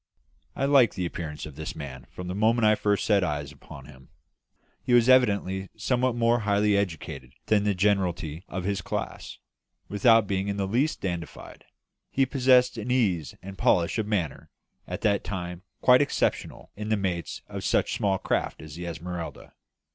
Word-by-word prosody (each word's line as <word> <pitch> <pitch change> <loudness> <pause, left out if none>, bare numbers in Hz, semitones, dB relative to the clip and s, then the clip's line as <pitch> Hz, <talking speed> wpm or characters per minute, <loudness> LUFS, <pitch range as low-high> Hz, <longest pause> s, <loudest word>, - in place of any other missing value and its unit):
I 135 - 0
liked 140 -5 +4
the 90 - -2
appearance 80 -3 -5
of 75 -3 -10
this 80 +1 -6
man 65 -4 -8
from 90 - -8
the 90 - -3
moment 110 +4 +2
that 110 - +6
I - - +5
first 105 -1 0
set 100 -3 +3
eyes 75 -4 -3
upon 70 - -12
him. 65 -2 -16 0.7
He 125 - -1
was 120 0 +5
evidently 100 -7 +3
somewhat 125 +3 0
more 120 0 +2
highly 105 -1 +2
educated 80 -9 -3
than 105 -1 +2
the 100 -1 +1
generality 90 -5 0
of 95 - -5
his 100 0 -1
class; - - -5 0.5
without 115 +2 +4
being 95 0 -1
in 100 0 -2
the 100 - 0
least 125 +10 0
dandified, 85 -3 -6 0.4
he 135 - +2
possessed 125 -2 +3
an 110 +3 -5
ease 100 - +1
and 95 0 -9
polish 85 +5 +2
of 105 - -2
manner 90 -10 -2 0.4
at - - -5
that 100 -2 +1
time 90 -3 -5 0.2
quite 125 +1 +6
exceptional 145 - -1
in 105 +1 -5
the 110 - +2
mates 90 -4 -3
of - - -6
such - - +1
small 95 -1 +1
craft 95 - -2
as 75 -2 -10
the 85 +2 -6
Esmeralda. 85 0 -6
100 Hz, 180 wpm, -26 LUFS, 85-110 Hz, 0.7 s, that